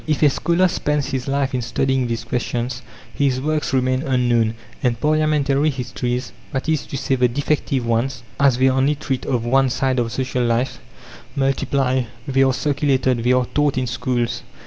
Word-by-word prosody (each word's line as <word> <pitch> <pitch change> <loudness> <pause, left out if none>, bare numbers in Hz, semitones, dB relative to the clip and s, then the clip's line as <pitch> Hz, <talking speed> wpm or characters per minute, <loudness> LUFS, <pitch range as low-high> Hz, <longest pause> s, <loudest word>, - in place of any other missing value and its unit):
If 155 0 +1
a 145 - +6
scholar 170 +6 +2
spends 150 -4 -1
his 130 -1 -3
life 135 -1 0
in 125 - 0
studying 130 +2 0
these 115 -1 -3
questions, 125 +1 -3 0.3
his 135 -3 +1
works 150 +2 -1
remain 130 -1 +1
unknown, 120 -4 +1 0.3
and 120 -3 0
parliamentary 150 -1 +2
histories 125 -1 -3 0.2
that 135 0 -3
is 155 -3 0
to 140 - -4
say, 135 0 -1
the 125 -1 +3
defective 140 0 -1
ones, 115 +2 -1 0.2
as 140 -3 +4
they 130 +1 +4
only 135 +3 +2
treat 135 -3 -3
of 120 -3 0
one 135 +2 +3
side 130 +1 0
of 115 -1 -1
social 125 0 -1
life 120 +2 0 0.6
multiply; 135 -1 +1 0.2
they 135 -1 +2
are 135 0 +4
circulated, 130 -3 +1
they 125 - +3
are 125 0 +2
taught 145 -2 +2
in 130 - 0
schools. 120 0 -1
130 Hz, 175 wpm, -21 LUFS, 125-140 Hz, 0.6 s, a